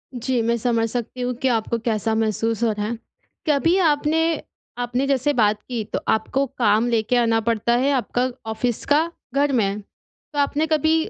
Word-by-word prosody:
जी, 245 0 0
मैं 235 +1 +1
समझ 230 -1 0
सकती 245 +2 -4
हूँ 250 0 -1
कि 265 - +2
आपको 230 -1 0
कैसा 220 -1 0
महसूस 225 +1 0
हो 230 - +3
रहा 210 -1 -3
है। 230 +2 -3 0.5
कभी 300 +5 +3
आपने 320 -1 +2 0.4
आपने 245 +2 -1
जैसे 275 +1 +1
बात 215 -4 +2
की, 235 -2 -4
तो - - -4
आपको 265 +5 +1
काम 225 -1 +2
लेके 230 +1 +1
आना 230 -1 +3
पड़ता 230 +1 +1
है 270 +3 +2
आपका 250 0 0 0.2
ऑफ़िस 235 +1 -2
का 315 +4 +2 0.2
घर 280 +1 +2
में। 205 -5 +1
तो 290 +8 -12
आपने 290 +2 +1
कभी 315 0 +2
245 Hz, 180 wpm, -22 LUFS, 225-280 Hz, 0.5 s, हो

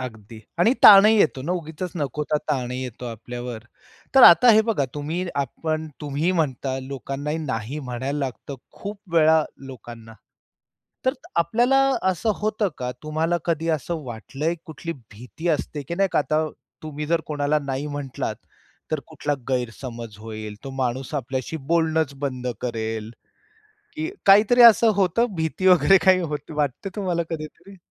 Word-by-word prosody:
अगदी 110 -3 -9 0.2
आणि 215 +8 +4
ताणही 210 +2 +9
येतो 135 -7 +2
ना. 170 - -2
उगीचच 170 0 -5
नको 150 0 -2
तो 150 - +3
ताणही 130 -2 -2
येतो 125 -1 -7
आपल्यावर. 120 0 -7 0.5
तर 265 - +7
आता 175 +9 +9
हे 220 - +6
बघा 215 -11 0
तुम्ही 160 +5 -3
आपण 155 +3 -2
तुम्ही 150 +4 -1
म्हणता 135 -5 -1
लोकांनाही 140 +3 -4
नाही 130 -2 -4
म्हणायला 130 +1 -4
लागतं 135 0 -5 0.2
खूप 205 0 -7 0.2
वेळा 160 -1 +5 0.2
लोकांना. 115 -3 -11 0.9
तर 260 - +4 0.2
आपल्याला 235 +11 +3 0.3
असं 215 +5 0
होतं 215 -1 -1
का? 125 -1 -3
तुम्हाला 160 +3 0
कधी 165 -1 -1
असं 155 +3 -5
वाटलंय 135 +7 -4
कुठली 160 0 -6 0.2
भीती 125 +10 -7
असते 150 -1 -2
की 170 - -3
नाही 195 0 +2
का - - +3
आता 155 +1 0 0.4
तुम्ही 150 -1 -5
जर 165 +1 +1
कोणाला 150 -1 0
नाही 140 +1 -3
म्हटलात, 145 -2 -4 0.6
तर - - 0
कुठला 145 0 -3 0.2
गैरसमज 120 -3 -4
होईल, 110 -1 -7
तो 135 - -6
माणूस 130 +1 -2
आपल्याशी 130 +3 -3
बोलणंच 160 -3 +1
बंद 130 -3 -3
करेल. 110 -2 -3 0.9
की 315 +2 -3 0.2
काहीतरी 210 +5 +6
असं 230 0 +8
होतं 200 +5 +2
भीती 160 +4 -2
वगैरे 180 +1 +6
काही 185 -1 +5
हो 150 -3 -2 0.2
वाटते 145 +5 -1
तुम्हाला 180 -4 -1
कधीतरी? 165 +5 -8
150 Hz, 145 wpm, -23 LUFS, 130-170 Hz, 0.9 s, ताणही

